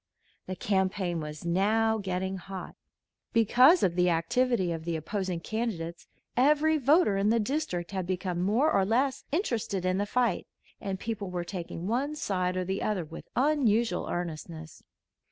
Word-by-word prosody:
The 185 - -3
campaign 190 -2 0
was 150 +1 -7
now 220 +5 +2
getting 190 0 -2
hot. 190 +1 -8 0.6
Because 250 - +6
of 175 - +3
the 180 0 +3
activity 235 +3 +1
of 165 -1 -4
the 170 0 -2
opposing 180 +2 -3
candidates 175 -6 -4 0.3
every 300 +4 +4
voter 280 - +4
in 200 +2 +2
the 230 +1 +3
district 210 - -2
had 190 -3 -3
become 180 -1 -2
more 230 +12 +2
or 195 - +3
less 255 +7 0
interested 230 - -1
in 185 +1 +1
the 205 - -1
fight, 240 -4 0 0.3
and 195 -1 -4
people 210 -3 -4
were 180 -1 -3
taking 175 -1 -6
one 265 +8 -1
side 185 -8 -1
or 185 - -1
the 190 +2 -2
other 200 -6 -1
with 165 +2 -10
unusual 240 -8 +2
earnestness. 160 -2 -5
195 Hz, 155 wpm, -29 LUFS, 180-235 Hz, 0.6 s, Because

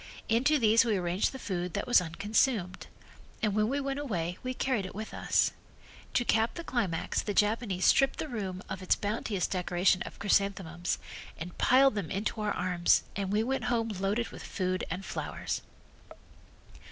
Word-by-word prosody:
Into 265 +7 +3
these 225 -3 +5
we 220 -3 +1
arranged 180 +1 0
the 265 - -7
food 180 -7 -3
that 200 - -1
was 245 -6 +5
unconsumed, 200 +3 0 0.6
and 210 -2 +2
when 215 +1 +2
we 280 +2 0
went 275 0 -2
away 180 - -3
we 255 - -3
carried 255 -7 0
it 185 - -7
with 215 +1 -6
us. - - +2 0.6
To 245 - +2
cap 225 0 +2
the 340 - -5
climax 200 - -1
the 205 - -3
Japanese 210 -3 +1
stripped 270 0 +4
the - - -3
room 195 -7 -4
of 190 0 -5
its 185 - +3
bounteous 205 -2 -2
decoration 180 0 +1
of - - -6
chrysanthemums 195 -4 0 0.4
and 170 +2 -7
piled 270 +1 +5
them 200 -7 -3
into 210 +3 -2
our 210 -1 0
arms 180 -1 +2
and 195 -1 -2
we 210 +2 +2
went 265 +2 -1
home 235 -2 0
loaded 205 +3 -1
with - - -10
food 185 -2 -2
and 185 +3 -4
flowers. - - -4
205 Hz, 175 wpm, -30 LUFS, 185-235 Hz, 0.6 s, these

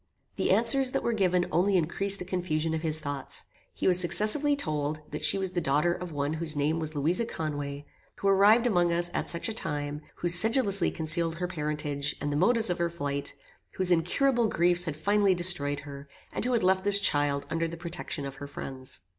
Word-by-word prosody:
The - - -1
answers 255 +3 +5
that - - -1
were 235 - -1
given 180 -4 +1
only 190 +3 +2
increased 195 +4 0
the 180 - -7
confusion 165 -3 -2
of 160 - -3
his 155 -1 +2
thoughts. 145 -2 -3 0.3
He - - -3
was 180 -1 +4
successively 215 - +3
told, 155 - -1
that 150 - -5
she - - +4
was 190 -2 -3
the 180 -1 -2
daughter 150 +3 +1
of 180 -1 -7
one 145 0 -2
whose 160 -1 -1
name 150 +3 -1
was 155 -1 -5
Louisa 165 +9 0
Conway, 145 -7 -5 0.3
who 200 - -3
arrived 205 +5 +4
among 175 -7 +2
us 175 +1 -1
at - - -3
such 170 - +2
a 225 - -4
time, 145 -6 -4
who 175 - -3
sedulously 200 +1 +4
concealed 165 +1 +1
her 180 +1 -4
parentage, 150 -3 -3
and 145 - -3
the - - -2
motives 220 +5 +2
of 175 - -3
her 170 0 0
flight, 140 -4 -5 0.4
whose 185 -1 +1
incurable 235 +9 +1
griefs 175 -2 +2
had 155 -4 -4
finally 200 +4 +1
destroyed 145 -5 +2
her, 140 -1 -11 0.2
and - - -3
who 250 - -1
had 230 - 0
left 190 0 +2
this 200 0 +4
child 145 -5 0
under 165 0 -1
the 165 +1 -8
protection 165 -3 -6
of 135 - -6
her 140 +1 -8
friends. 135 -3 -8
170 Hz, 205 wpm, -27 LUFS, 150-195 Hz, 0.4 s, answers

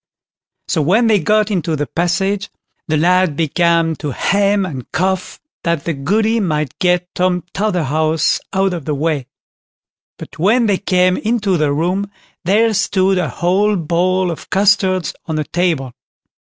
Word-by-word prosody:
So 160 - 0
when 195 +11 +3
they 220 -2 +3
got 215 +1 +1
into 170 -4 -1
the 145 0 -2
passage, 190 +5 -1 0.4
the 155 - +1
lad 180 0 +2
began 165 +1 +1
to 150 - -4
hem 200 +7 +1
and 135 -9 -7
cough, 185 +1 -2 0.2
that 170 -4 -1
the 170 - -1
Goody 215 +11 0
might 150 - -2
get 180 -1 +1
Tom 180 -1 0
Totherhouse 160 -6 0
out 195 -1 +1
of 165 -6 -5
the 150 - -1
way. 145 -3 -1 0.9
But - - -11
when 225 +8 +3
they 200 -3 +1
came 185 -2 +2
into 215 -4 0
the 155 -3 +1
room, 180 +7 -1 0.3
there 215 +5 +2
stood 195 -2 +1
a 165 -5 -1
whole 195 - +1
bowl 180 +2 0
of 165 - -9
custards 190 -2 +2
on 160 - -2
the 155 - 0
table. 160 -7 -1
180 Hz, 150 wpm, -17 LUFS, 160-195 Hz, 0.9 s, when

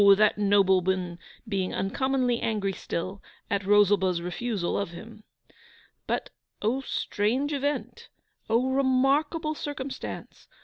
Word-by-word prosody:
that 210 +1 +4
nobleman 190 -3 +2 0.3
being 195 -3 -1
uncommonly 250 +3 0
angry 205 -3 0
still 185 +2 -4 0.3
at 200 0 +1
Rosalba's 200 -3 +4
refusal 180 +2 -2
of 200 -3 -1
him. 215 +5 -11 0.8
But - - -2 0.3
O 235 +6 0
strange 255 +6 0
event! 285 +1 -3 0.4
O 245 +4 +2
remarkable 275 +4 +2
circumstance! 280 -3 -6
215 Hz, 100 wpm, -27 LUFS, 195-265 Hz, 0.8 s, that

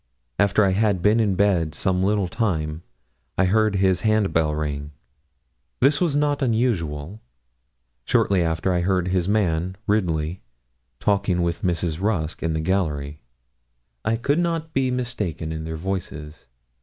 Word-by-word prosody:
After 100 +1 +4
I 95 - +3
had 100 -2 +1
been 105 +2 +4
in 105 -4 +2
bed 90 -6 +1
some 95 -1 0
little 100 0 +1
time, 80 -7 -2 0.6
I 95 - +4
heard 110 +2 +2
his 95 -1 +2
hand 110 -2 +2
bell 75 -2 +2
ring. 75 -1 -4 0.9
This 140 +5 +3
was 165 -5 +2
not 145 -1 +1
usual. 105 - -1 0.8
Shortly 95 -2 +2
after 80 +2 0
I 90 - +1
heard 90 0 +1
his 90 0 0
man, 95 -3 +1
Ridley, 90 -5 0 0.6
talking 100 -3 +1
with 85 -1 -2
Mrs. 85 -2 -1
Rusk 90 -7 -1
in 80 -1 -1
the 80 - -1
gallery. 75 -5 -1 0.8
I 110 - +1
could 140 +7 +1
not 165 -2 -1
be 130 -1 +1
mistaken 115 -11 -3
in 80 0 -5
their 80 0 -4
voices. 80 -4 -5
95 Hz, 145 wpm, -23 LUFS, 80-110 Hz, 0.9 s, After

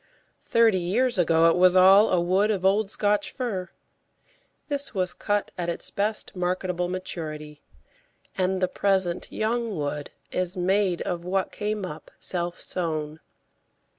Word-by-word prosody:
Thirty 225 -4 +3
years 215 +6 +1
ago 165 -1 +4
it 165 - +4
was 180 0 +5
all 195 +3 +7
a 180 - +2
wood 185 +5 +2
of 195 -4 -1
old 200 +1 +3
Scotch 205 -1 +1
fir. 210 -8 -4 1.0
This 285 -5 -2
was 185 -2 0
cut 205 -1 -1
at 175 -1 -2
its 170 - +1
best 210 +1 -1
marketable 180 0 -1
maturity, 155 -5 -6 0.7
and 185 0 0
the - - +4
present 190 -2 -1
young 225 -2 -1
wood 145 0 -3 0.2
is 185 +1 -2
made 185 0 +1
of 175 -1 -3
what 190 +1 -1
came 210 -1 -3
up 155 -3 -9
self 175 -1 -2
sown. 155 -3 -4
185 Hz, 140 wpm, -25 LUFS, 175-205 Hz, 1.0 s, all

